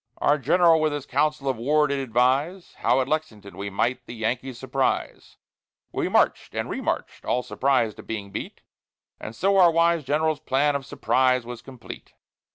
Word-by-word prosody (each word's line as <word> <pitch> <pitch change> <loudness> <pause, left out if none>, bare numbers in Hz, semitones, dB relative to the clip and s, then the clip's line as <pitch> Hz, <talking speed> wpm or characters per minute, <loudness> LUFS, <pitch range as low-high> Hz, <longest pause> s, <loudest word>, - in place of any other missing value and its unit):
Our 145 +1 +2
general 165 +2 +4
with 155 -1 +1
his 145 -2 -4
council 150 -1 0
of 130 -3 0
war 150 +6 +2
did 140 -1 -1
advise 135 - 0
How 125 +2 +2
at 130 - -2
Lexington 125 -10 -4
we 100 +1 -5
might 115 +6 -1
the 120 - -8
Yankees 120 +3 -3
surprise; 130 +1 -2 0.5
We - - -2
march'd - - +1
and - - -3
re - - -3
marched - - -3
all 125 - 0
surprised 130 -6 0
at - - -12
being 105 -3 -5
beat; - - -7 0.6
And 110 - -8
so 195 +6 +2
our 180 -2 +7
wise 170 -1 +2
general's 150 +2 0
plan 140 +2 +1
of 140 -1 -4
surprise 130 -3 +1
was 120 -1 -8
complete. 130 -3 -11
135 Hz, 175 wpm, -24 LUFS, 120-155 Hz, 0.6 s, our